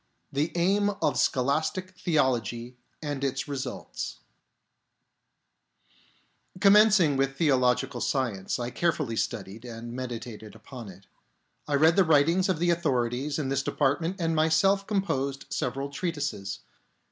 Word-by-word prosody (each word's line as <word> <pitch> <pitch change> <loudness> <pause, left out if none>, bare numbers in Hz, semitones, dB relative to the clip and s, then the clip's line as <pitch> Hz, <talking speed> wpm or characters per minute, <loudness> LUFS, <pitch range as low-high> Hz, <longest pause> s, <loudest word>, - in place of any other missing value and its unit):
The 150 +4 0
Aim 195 +4 +2
of - - +1
Scholastic 155 +8 0
Theology 125 - -1 0.3
and 145 -2 -3
its 135 +1 -1
Results 140 -2 -5 2.4
Commencing 200 -7 +6
with 135 0 0
theological 130 -5 +2
science, 115 -9 -1
I 120 0 -4
care 170 +5 +2
fully 135 -8 -4
studied 105 0 -3
and 120 -1 -8
meditated 120 -4 -6
upon 115 0 -10
it. 95 +1 -14 0.6
I 145 - +1
read 160 +5 +4
the 195 - +7
writings 165 +4 +3
of 185 - +1
the 175 +2 +2
authorities 135 -3 0
in 145 -4 -2
this 135 0 +1
department 150 +6 0
and 165 -1 0
myself 160 +6 +3
composed 140 -10 -1
several 135 +1 -2
treatises. 145 - -3
140 Hz, 125 wpm, -27 LUFS, 125-170 Hz, 2.4 s, the